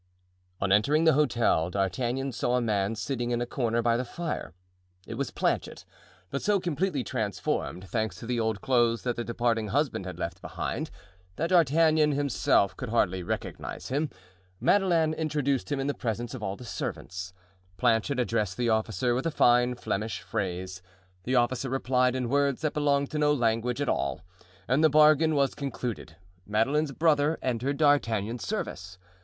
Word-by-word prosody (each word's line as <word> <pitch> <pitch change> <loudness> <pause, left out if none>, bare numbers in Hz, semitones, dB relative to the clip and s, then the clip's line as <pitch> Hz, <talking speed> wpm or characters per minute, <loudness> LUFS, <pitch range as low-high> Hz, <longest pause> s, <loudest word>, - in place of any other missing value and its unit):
On 100 -1 0
entering 140 +11 +4
the 160 -1 +5
hotel 120 - +2
D'Artagnan 120 +8 -1
saw 120 +1 0
a 125 - +2
man 105 -2 0
sitting 120 +2 -3
in 120 -1 0
a 120 - -1
corner 120 -2 -1
by 115 0 +3
the 125 - -1
fire. 160 - -5 0.5
It - - -7
was 135 +3 -2
Planchet, - - -2 0.5
but 140 - -2
so 205 -1 +2
completely 175 -4 -1
transformed, 95 -3 -3
thanks 110 -2 -2
to 90 - -9
the 120 0 -1
old 110 -3 -1
clothes 120 -3 +2
that 120 -2 -1
the 120 - -3
departing 115 -2 0
husband 130 - -1
had 90 - -6
left - - -5
behind, - - -4 0.5
that 165 +3 -2
D'Artagnan 155 -2 +4
himself 140 -8 +2
could 125 - -6
hardly 95 -5 +1
recognize 85 - -5
him. 145 +4 0 0.5
Madeleine 170 -6 +3
introduced 150 -4 -1
him 145 - 0
in 140 +1 -1
presence 120 -1 -3
of 130 - -6
all 100 -2 -3
the 125 - -11
servants. 95 -4 -5 0.5
Planchet 120 +2 +2
addressed 110 -6 0
the 120 -1 +1
officer 110 +3 +1
with 130 +6 -1
a - - +2
fine 125 -4 +3
Flemish 110 -3 -3
phrase; 95 -1 -4 0.4
the 130 - 0
officer 125 +2 +1
replied 125 -1 +1
in 125 -2 -1
words 140 +1 +1
that 155 -2 -1
belonged 140 -2 +1
to 155 - -2
no 150 0 +3
language 120 -1 0
at 145 - -1
all, - - -1 0.5
and 135 +6 +2
the 160 - +6
bargain 155 +1 +5
was 140 -2 +2
concluded; 125 - -5 0.3
Madeleine's 135 +8 +1
brother 155 +1 +2
entered 130 +3 -1
D'Artagnan's 115 -7 +1
service. 90 0 -4
125 Hz, 165 wpm, -28 LUFS, 110-145 Hz, 0.5 s, the